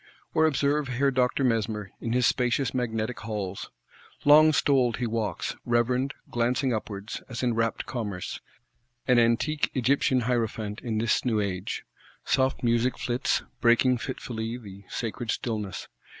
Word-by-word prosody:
Or 160 0 +4
observe 145 0 +1
Herr 135 +2 +1
Doctor 130 +1 +1
Mesmer, 110 -5 0
in 115 - -2
his 125 0 +3
spacious 125 +1 +1
Magnetic 115 -2 -2
Halls. 100 -4 -4 0.6
Long 155 +2 +8
stoled 135 -5 +2
he 125 - -1
walks; 110 -2 -2
reverend, 125 +3 +1 0.2
glancing 125 +2 +1
upwards, 105 -1 -5
as 120 0 -4
in 120 -1 +2
rapt 115 0 -1
commerce; 105 -8 -4 0.7
an 125 -1 +5
Antique 120 +6 +2
Egyptian 130 0 +2
Hierophant 110 -3 -1
in 115 -4 -2
this 110 +1 +1
new 115 -4 +1
age. 95 -3 -3 0.4
Soft 130 -1 +1
music 120 +1 +2
flits; 125 +2 0 0.2
breaking 120 +1 +4
fitfully 115 -2 -4
the 100 -4 -12
sacred 115 0 -4
stillness. 105 -5 -3
120 Hz, 135 wpm, -27 LUFS, 110-130 Hz, 0.7 s, Long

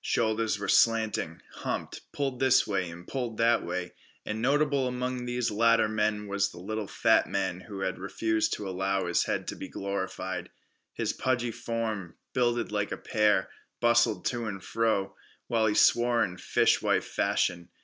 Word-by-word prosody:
Shoulders 110 -1 +1
were - - -4
slanting, 110 -7 +2
humped, - - -4
pulled 135 -3 -2
this 130 -1 +4
way 95 -4 -1
and 85 +1 -11
pulled 120 -5 -3
that 115 0 +3
way. 90 -1 -4 0.3
And 110 +1 -3
notable 140 0 +2
among 125 0 -3
these 120 -1 -1
latter 115 +1 +4
men 105 -1 0
was 100 0 0
the - - -13
little 105 +3 -4
fat - - +3
man 95 -2 -1
who 100 -1 -8
had 95 -1 -2
refused 110 +3 0
to 105 - -4
allow 95 0 -1
his 85 0 +1
head - - -2
to - - -5
be - - -7
glorified. 95 -1 -4 0.5
His - - -1
pudgy 120 -2 0
form, 110 -6 -4 0.2
builded 120 -3 +1
like 105 -1 -1
a - - -3
pear, 105 -3 +2 0.3
bustled 120 0 +3
to 120 -2 -1
and 95 -2 -5
fro, 100 -4 0 0.3
while 115 -2 +1
he 105 - +1
swore 120 0 +4
in 90 -1 -4
fishwife - - +2
fashion. 85 -1 0
110 Hz, 165 wpm, -28 LUFS, 95-120 Hz, 0.5 s, this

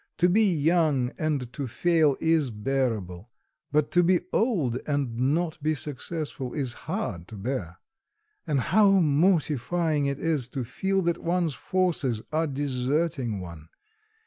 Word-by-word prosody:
To 175 - +4
be 210 +1 +4
young 155 -5 +2
and 145 -6 -1
to 140 -3 -4
fail 150 +3 +2
is 160 -4 +2
bearable; 110 -5 -2 0.4
but 150 0 +1
to 175 - +5
be 175 +1 +3
old 165 - +1
and 140 -5 -1 0.2
not 165 -2 -2
be 155 +1 +1
successful 145 -2 -4
is 130 -5 -1 0.2
hard 105 - -3
to 110 - -10
bear. 100 -5 -4 0.7
And 145 -3 +1
how 205 - +4
mortifying 155 -2 +2
it 140 -1 -2
is 150 -6 -1
to 130 - 0
feel 190 +10 -1
that 170 0 0
one's 170 -2 0
forces 155 -11 -1
are 160 +1 +1
deserting 135 - -1
one! 85 -3 -10
145 Hz, 140 wpm, -26 LUFS, 125-170 Hz, 0.7 s, to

